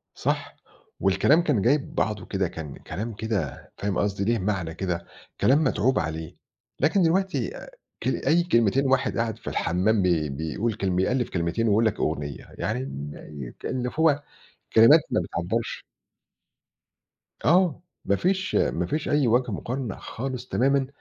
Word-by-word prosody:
صح، - - -2 0.4
والكلام 95 - +4
كان 145 - +2
جايب 135 +6 +1
بعضه 105 -4 -1
كده، 95 -1 -1
كان 80 -4 -7
كلام 110 +8 -5
كده 100 - -3
فاهم 100 -2 -2
قصدي؟ 100 -1 0
ليه 115 +3 +1
معنى 95 -4 -2
كده، 90 -2 -3 0.4
كلام 145 +5 +4
مَتعوب 130 -1 +2
عليه. 80 +2 -4 0.4
لكن 160 +8 +3
دلوقتي 185 +3 +1 0.5
كل - - +1
أي 170 +2 +2
كلمتين 130 - +2
واحد 135 -1 +1
قاعد 115 -2 -1
في - - -6
الحمام 95 +5 +1
بي 85 -5 +2
بيقول 80 +11 -2
كلم 95 -4 -1
بيألِّف 120 +7 +1
كلمتين 85 +6 0
ويقول 110 +2 +3
لك 110 - 0
أغنية، 75 -2 -3
يعني - - -1
إن 70 +3 -7
يك - - -9
اللي 125 -1 -1
هو 160 -2 +4 0.6
كلمات 115 +9 +8
ما - - +2
بتعبّرش. 110 +7 -3 1.6
آه. 175 -1 +4 0.2
ما 100 - +3
فيش 190 - 0
ما 85 - +1
فيش 150 - -2
أي 145 -4 +3
وَجه 120 +1 +2
مقارن 120 +1 -3
خالص 130 0 -5
تمامًا 135 +1 +2
110 Hz, 150 wpm, -25 LUFS, 90-135 Hz, 1.6 s, كلمات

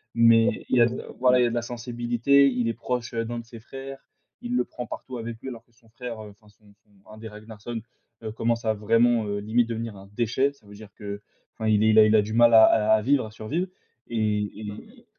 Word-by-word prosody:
mais 115 -1 +4
il - - +2
y - - +6
a 120 - +6
de 120 +2 -5 0.2
voilà, 125 0 +4
il - - +4
y - - +4
a - - +1
de 115 - -4
la 120 - 0
sensibilité, 120 +3 +1
il 120 -2 -1
est 115 - 0
proche, 125 +1 -4
heu, 115 0 -1
d'un 120 +1 -5
de 115 - -10
ses 115 0 -12
frères, 135 +3 -9 0.4
il 120 +1 -3
le 125 - +2
prend 125 - -7
partout 130 -1 -8
avec 115 0 -6
lui 135 - -6
alors 115 -3 -9
que - - -35
son 115 -1 -27
frère 120 0 -8
enfin 105 0 -13
son 105 0 -23
son 105 - -33 0.2
un 110 - -12
des 110 +1 -9
Ragnarson, 110 +2 -8 0.4
heu, 110 - -4
commence 115 +1 -1
à 110 - +2
vraiment, 115 +2 +2
heu, 100 0 -2
limite 115 +3 +1
devenir 115 -1 -4
un 100 0 -14
déchet, 120 +5 0
ça 140 -6 -27
veut 100 - -13
dire 105 0 -12
que 100 0 -7 0.4
enfin 110 -1 -1
il 105 0 +3
est - - +4
il 110 0 +6
a 110 - +8
il 110 +1 +3
a 110 - +6
du 105 +1 -5
mal 120 0 +5
à 110 -1 +9 0.3
à 110 - 0
vivre, 135 +2 +2
à 110 - -10
survivre 145 +13 -3 0.4
et 110 -2 0
et 105 +1 -8
I 105 0 -11
115 Hz, 260 wpm, -25 LUFS, 110-120 Hz, 0.4 s, à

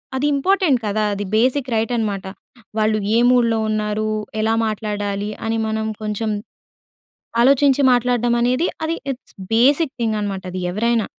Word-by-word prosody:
అది 265 +2 0
ఇంపార్టెంట్ 330 -2 +2
కదా! 215 +1 0
అది 205 0 -3
బేసిక్ 255 +2 +1
రైట్ 225 +2 0
అనమాట. 205 -4 -2 0.5
వాళ్ళు 215 0 +2 0.2
ఏ - - +4
మూడ్‌లో 235 -3 +3
ఉన్నారు? 215 0 -1 0.3
ఎలా 220 +1 +2
మాట్లాడాలి? 205 -1 -3 0.2
అని 225 0 0
మనం 220 0 -2 0.2
కొంచెం 215 +1 -2 1.1
ఆలోచించి 275 +2 +4
మాట్లాడడం 245 -1 +1
అనేది 255 +8 +2 0.2
అది 325 +1 -1 0.2
ఇట్స్ 260 - -11 0.2
బేసిక్ 280 +5 +3
థింగ్ 220 -2 0
అనమాట. 195 -2 -3
అది 185 - -4
ఎవరైనా. 225 +2 +1
225 Hz, 140 wpm, -20 LUFS, 215-255 Hz, 1.1 s, ఏ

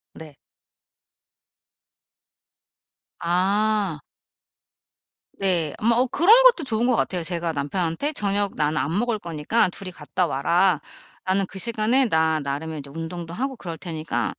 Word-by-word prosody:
네. 155 -3 -11 2.8
아. 195 -1 +1 1.4
네. 175 -6 +1
어 - - -10
뭐 235 +1 +4
어 - - +3
그런 415 - +6
것도 485 -9 +6
좋은 235 -3 0
것 250 - +3
같아요. 180 -5 -1
제가 170 -1 -2
남편한테 165 - -2
"저녁 200 -4 0
나는 150 +1 0
안 165 +7 -1
먹을 235 -1 0
거니까 170 +6 0
2이 185 +1 -7
갔다 170 +2 -2
와라. 170 +6 +2 0.5
나는 190 +1 +1
그 195 - -11
시간에 235 +4 +2
나 160 -1 +2
나름의 150 +2 -4
이제 140 -1 -9
운동도 165 +1 -6
하고 265 +6 -3
그럴 170 -8 -7
테니까." 155 - -3
180 Hz, 245 characters per minute, -23 LUFS, 160-215 Hz, 2.8 s, 그런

